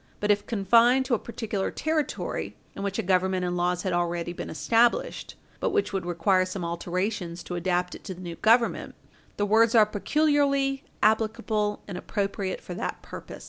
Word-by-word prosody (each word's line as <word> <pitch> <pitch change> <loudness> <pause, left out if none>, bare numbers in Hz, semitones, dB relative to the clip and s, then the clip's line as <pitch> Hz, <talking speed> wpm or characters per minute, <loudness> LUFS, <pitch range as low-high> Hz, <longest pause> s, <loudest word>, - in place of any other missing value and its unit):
But 210 0 +2
if 205 0 0
confined 235 +5 +4
to 255 - -1
a 230 - +2
particular 215 -4 -3
Territory, 315 -1 -2 0.2
in - - -6
which 200 -1 -2
a - - -1
Government 185 0 +1
and 175 0 -1
laws 180 0 0
had 185 -3 -1
already 175 0 -1
been - - -6
established 235 - +1 0.2
but - - 0
which 415 - 0
would 190 -3 -2
require 185 +2 +2
some 185 -1 -4
alterations 175 +1 -3
to - - -7
adapt 180 0 0
it - - -10
to 185 - -5
the 180 - -11
new 170 -2 -6
Government, 230 +1 +2 0.4
the 205 - +1
words 225 +2 +4
are 220 -2 +7
peculiarly 275 +4 +1 0.2
applicable 215 -1 +1
and 185 -3 -5
appropriate 200 -2 -3
for 180 - -7
that 175 - -4
purpose. - - -9
200 Hz, 180 wpm, -26 LUFS, 180-230 Hz, 0.4 s, are